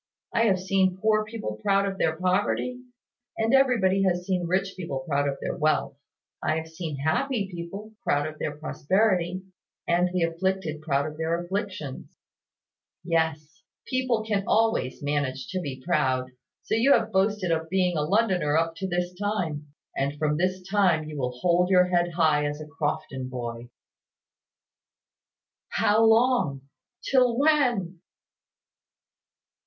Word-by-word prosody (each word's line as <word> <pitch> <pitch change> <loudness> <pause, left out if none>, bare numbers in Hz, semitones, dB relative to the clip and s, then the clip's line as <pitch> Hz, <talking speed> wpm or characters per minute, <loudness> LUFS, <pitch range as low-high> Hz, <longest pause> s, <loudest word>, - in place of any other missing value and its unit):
I 230 - +3
have 190 -4 +3
seen 190 0 +1
poor 215 +1 +2
people 215 - -6
proud 195 - +2
of 195 -1 -4
their 160 0 +1
poverty; 185 +8 0 0.6
and 225 +2 +1
everybody 235 -8 +4
has 180 -2 +1
seen 180 -2 -1
rich 190 +2 0
people 140 -8 -5
proud 145 -2 +1
of 140 - -4
their - - -3
wealth. 155 -2 +1 0.5
I 155 - +1
have 160 0 -4
seen 160 -2 -5
happy 195 - -1
people 195 +6 -7
proud 145 -6 +1
of 155 0 -7
their 150 -1 -3
prosperity, 185 +3 0 0.4
and 175 +1 +2
the 180 -2 0
afflicted 165 -2 -1
proud 140 -2 0
of 150 0 -6
their 165 +1 0
afflictions. 185 -8 -5 0.9
Yes; 160 -2 -1 0.2
people 255 -4 0
can 210 -3 -1
always 220 - +1
manage 140 -3 -1
to 185 - -2
be 135 -5 -5
proud: 130 -7 +1 0.3
so - - -3
you 240 +6 +5
have 225 -1 +1
boasted 190 -1 +1
of 160 0 -1
being 180 -1 +1
a 150 - +1
Londoner 180 -4 +2
up 165 0 +1
to 190 - -3
this 175 0 -2
time; 180 -7 -3 0.3
and 140 +2 -1
from 150 0 0
this 185 +3 -1
time 190 -6 +3
you 155 0 -8
will 125 -3 -3
hold 180 +1 +3
your 180 -1 +5
head 175 -1 +1
high 155 -3 +3
as 145 +1 -4
a 155 - -7
Crofton 145 -3 -3
boy." 120 -1 -6 2.0
"How 215 +2 +3
long? 225 - +3 0.4
Till 250 -3 +3
when?" 245 - +2
180 Hz, 150 wpm, -26 LUFS, 150-200 Hz, 2.0 s, you